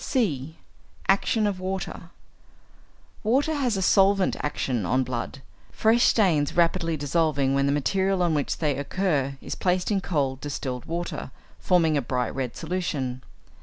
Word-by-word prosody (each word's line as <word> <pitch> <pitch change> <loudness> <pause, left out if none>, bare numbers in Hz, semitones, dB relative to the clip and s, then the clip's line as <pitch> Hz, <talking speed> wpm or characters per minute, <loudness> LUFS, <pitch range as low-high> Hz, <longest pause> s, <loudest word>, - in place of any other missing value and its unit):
(c) 160 - -1 0.5
=Action 210 +3 +2
of 200 -3 -1
Water.= 185 -2 -5 1.1
Water 270 +8 +2
has 255 -8 0
a 190 - 0
solvent 195 0 +4
action 130 -6 -2
on 130 +9 +1
blood, 130 +2 -5 0.3
fresh 225 +1 +3
stains 170 -9 +2
rapidly 165 -1 +2
dissolving 145 -2 +1
when 140 0 +2
the - - +2
material 190 +6 +1
on 170 -2 +2
which 145 -2 -1
they 150 -4 0
occur 140 -3 -1
is - - -4
placed 180 +2 0
in 200 -2 +1
cold 140 -7 -1
distilled 130 -3 -4
water, 170 -3 -4 0.3
forming 165 -4 +3
a - - +1
bright 125 0 -2
red 130 -3 -3
solution. 155 -7 -3
165 Hz, 145 wpm, -25 LUFS, 140-190 Hz, 1.1 s, solvent